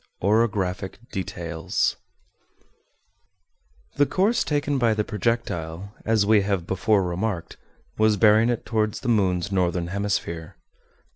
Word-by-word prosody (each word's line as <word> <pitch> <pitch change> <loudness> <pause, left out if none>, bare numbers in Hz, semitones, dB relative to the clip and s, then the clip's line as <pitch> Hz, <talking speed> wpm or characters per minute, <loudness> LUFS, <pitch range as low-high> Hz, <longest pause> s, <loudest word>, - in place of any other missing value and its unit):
OROGRAPHIC 100 -3 0
DETAILS 85 -3 -2 2.0
The 145 0 +4
course 205 +5 +2
taken 145 -2 0
by 115 -3 +3
the 105 - 0
projectile, 100 -5 -3
as 110 -2 +2
we 105 0 +5
have 100 -3 -1
before 95 +2 +1
remarked, 90 0 -3 0.4
was 110 -1 +4
bearing 110 +3 +5
it 120 - -2
toward 110 -2 0
the 135 - -6
moon's 100 -4 +1
northern 90 -2 0
hemisphere. 95 -4 -3
100 Hz, 115 wpm, -24 LUFS, 90-110 Hz, 2.0 s, we